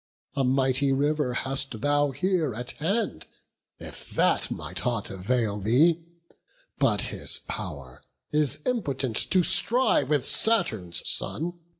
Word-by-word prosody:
A 135 - +1
mighty 135 +1 +2
River 145 -1 0
hast 135 -3 -2
thou 145 0 +2
here 155 - -1
at 125 +2 -4
hand, 190 - -2 0.5
If - - -10
that - - +2
might 85 +4 -5
aught 115 -4 -1
avail 105 +2 -1
thee; 155 - +3 0.8
but - - +2
his - - 0
pow'r 65 -3 -7 0.3
Is 150 -2 +1
impotent 140 - -2
to 185 -1 +3
strive 190 - +2
with 145 -4 0
Saturn's 110 - +2
son. 170 +3 +1
135 Hz, 120 wpm, -26 LUFS, 115-160 Hz, 0.8 s, thee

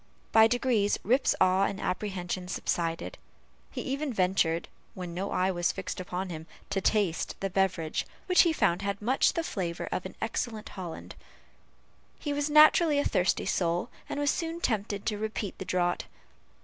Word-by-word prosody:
By 220 0 +7
degrees, 235 -4 +1
Rip's 255 +7 +3
awe 185 +1 +4
and 200 0 -3
apprehension 185 -1 -3
subsided. 165 -2 -2 0.5
He - - -5
even 280 +2 -2
ventured, 180 -5 +1 0.3
when 180 -2 -6
no 190 +3 -3
eye 185 +1 +1
was 175 -1 +1
fixed 185 0 -5
upon 185 +1 -4
him, 160 0 -7 0.2
to 195 - 0
taste 195 -5 +1
the 195 -1 -2
beverage 180 -4 0 0.2
which 365 -1 +6
he 340 - +4
found 180 - +1
had 200 0 -2
much 250 +6 +2
of - - -2
the 335 - 0
flavor 175 - -3
of - - -2
excellent 220 -3 -3
Hollands. 180 -4 -7 1.0
He 290 - -3
was 290 +1 0
naturally 305 +1 +6
a 285 - +2
thirsty 180 +1 +1
soul, 175 -2 0 0.2
and - - -3
was 290 -1 +3
soon 330 0 -3
tempted 205 - -1
to 210 -2 -1
repeat 215 -2 -4
the 190 - -5
draught. 175 -1 0
195 Hz, 165 wpm, -29 LUFS, 180-245 Hz, 1.0 s, By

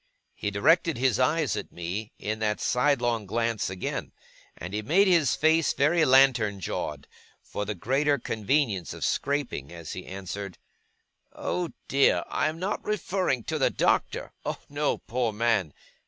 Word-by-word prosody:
He - - -3
directed 160 - +3
his 125 -2 +2
eyes 150 +3 +2
at - - -5
me 90 +6 -5
in 110 +1 -3
that 105 -1 0
sidelong 120 -5 +1
glance 115 0 -1
again, 95 -1 -4 0.4
and 90 +3 -7
he 105 - -1
made 180 - +3
his 170 -6 +4
face 160 0 +3
very 155 +5 +3
lantern 130 -7 +4
jawed, 75 -5 -4 0.3
for 105 - -5
the 105 +1 -3
greater 140 - +1
convenience 110 - -1
of - - -3
scraping, 140 - -1
as 85 -2 -7
he 90 - -7
answered: 95 0 -6 0.8
'Oh 180 -2 -2 0.2
dear, 140 0 +3
I - - +1
am 155 - -6
not 190 +4 -3
referring 190 - -1
to - - -3
the - - +3
Doctor! - - 0
Oh - - -3
no, 145 +1 0
poor 120 -1 -2
man! 105 -6 +1
120 Hz, 155 wpm, -27 LUFS, 105-145 Hz, 0.8 s, his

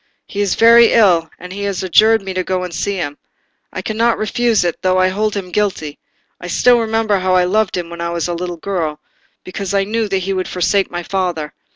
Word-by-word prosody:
He 205 - -4
is 200 -3 0
very 230 0 +6
ill, 175 -8 +4
and 180 +1 -10
he 200 - -6
has 195 -2 -3
adjured 215 +4 +4
me 190 -1 -5
to 185 0 -1
go 185 0 -2
and 180 -2 -6
see 200 +5 -2
him. 145 -6 -5 0.5
I - - -6
cannot 230 +2 0
refuse 220 0 +1
it, 175 -1 -3
though 185 0 +1
I 185 0 +3
hold 210 +2 -1
him 185 -3 -5
guilty; 175 -7 -2 0.4
I 180 - -8
still 245 +7 +3
remember 225 -2 0
how 185 0 +1
I 180 - +4
loved 200 +2 0
him 170 -1 -5
when 170 0 -7
I 170 - -2
was 170 0 -2
a 175 - -2
little 175 0 -5
girl, 160 -4 -3 0.4
before 195 +1 -3
I - - +1
knew 220 +2 -2
that 195 - 0
he 190 +1 -2
would 185 -1 -2
forsake 190 +2 0
my 175 0 -5
father. 175 -5 -3
190 Hz, 230 wpm, -17 LUFS, 175-210 Hz, 0.5 s, very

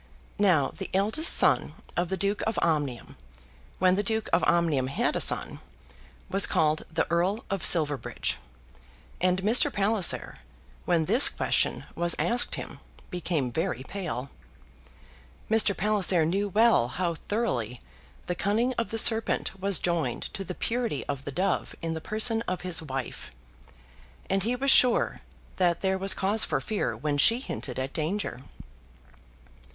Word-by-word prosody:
Now 175 -9 +3
the 190 - -7
eldest 220 - +1
son - - +2 0.2
of 175 0 -1
the 190 - -2
Duke 200 +2 0
of 225 - -2
Omnium, 145 -7 -2 0.6
when 185 -1 +3
the 195 - +1
Duke 220 +1 -1
of - - +3
Omnium 160 -7 +1
had 220 - -1
a - - +1
son, - - +1 0.7
was 195 +1 +2
called 155 0 0
the 160 - 0
Earl 185 +6 0
of 195 -2 -2
Silverbridge; 150 -6 +2 0.8
and 185 +1 +1
Mr. 225 +5 +4
Palliser, 200 -1 +2 0.5
when 170 -3 +1
this 235 - +7
question - - 0
was 175 0 +1
asked 240 +1 0
him, - - -8 0.3
became 165 -8 -2
very 130 -3 -3
pale. 155 -8 -6 1.2
Mr. 220 -3 +4
Palliser 195 -5 +2
knew 195 +5 -1
well 220 - +3
how 170 +6 -2
thoroughly 125 - -2 0.5
the 180 - -2
cunning 220 +8 0
of 230 - -2
the 225 - -3
serpent 220 -3 +1
was 195 -2 +2
joined 165 -9 -2
to 195 - -5
the 180 -1 -7
purity 230 - -3
of 140 -2 -5
the 140 - -5
dove 185 +8 -2
in 165 0 -3
the 160 - -6
person 225 +3 +2
of 185 - -3
his 180 -2 0
wife, 135 -5 -6 1.0
and 195 0 +1
he 235 +6 -1
was 270 +2 +2
sure 250 -2 +4 0.4
that 175 -2 +1
there 190 0 0
was 195 +1 +1
cause 205 +3 +2
for - - -1
fear 215 - -3
when 145 -1 -2
she 230 - +5
hinted 135 - -5
at 130 +1 -4
danger. 165 -2 -3
185 Hz, 150 wpm, -27 LUFS, 160-210 Hz, 1.2 s, this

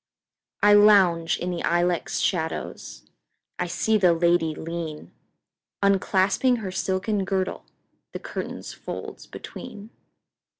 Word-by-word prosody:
I 205 0 +7
lounge 195 -6 +5
in 180 +1 -3
the 175 - -3
ilex 175 0 0
shadows,I 160 -4 -5
see 220 -1 +1
the 180 -3 +5
lady 165 -2 +2
lean, 165 -2 -6 0.7
Unclasping 200 +5 +2
her 200 -5 -5
silken 195 +2 -1
girdle, 190 0 -2 0.5
The - - -5
curtain's - - -6
folds - - -8
between. 210 +2 -10
185 Hz, 100 wpm, -25 LUFS, 170-205 Hz, 0.7 s, I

